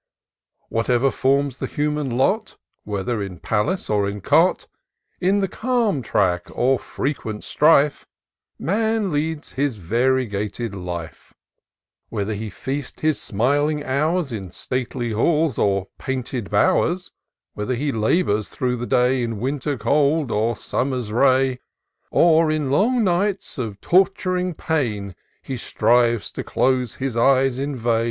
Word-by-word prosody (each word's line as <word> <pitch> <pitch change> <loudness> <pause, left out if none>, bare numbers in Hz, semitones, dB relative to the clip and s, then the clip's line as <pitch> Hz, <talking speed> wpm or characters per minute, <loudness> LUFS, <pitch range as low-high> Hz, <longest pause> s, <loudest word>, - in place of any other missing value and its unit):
Wliatever 120 +3 +2
forms 135 0 +1
the - - -3
human 150 -1 -1
lot, 210 - 0 0.3
Whether 105 +2 -2
in 95 -3 -5
palace 110 - -1
or 100 -1 +1
in 100 +1 -5
cot, - - +3 0.5
In 195 +3 +2
the 195 - +1
calm 225 - 0
track 95 -6 0
or 130 +1 +2
frequent 115 -7 -4
strife, 150 -1 +3 0.5
Man 220 +1 0
leads 155 +1 -2
his 140 -2 -1
variegated 115 +1 -1
life; 85 -4 -7 0.7
Whether 110 -1 -2
he 105 +1 -5
feast 135 +7 -5
his 155 -2 +1
smiling 145 +7 +1
hours 150 +3 0
In 100 -5 -5
stately 125 0 -3
halls 150 +5 +1
or 100 -1 +1
painted 130 -4 -4
bow'rs; 175 - +2 0.4
Whether 105 +5 -2
he 140 +4 -1
labour 110 - +1
through 125 +4 -2
the 120 +1 -4
day 125 +1 +2
In 115 -3 -3
Winter's 140 +2 -2
cold, 145 0 +2
or 115 +2 +1
Summer's 125 -5 -2
ray; 130 +1 +3 0.5
Or, 165 -1 +4
in 150 -3 0
long 230 - +3
nights 190 -3 0
of 110 -5 -4
tort'ring 185 -1 +2
pain, 110 -13 -2 0.3
He 130 - -4
strive 120 0 +2
to - - -4
close 125 -3 0
his 135 -3 -3
eyes 130 +1 +3
in 140 +1 -2
vain. 115 -2 +1
130 Hz, 130 wpm, -22 LUFS, 110-150 Hz, 0.7 s, Or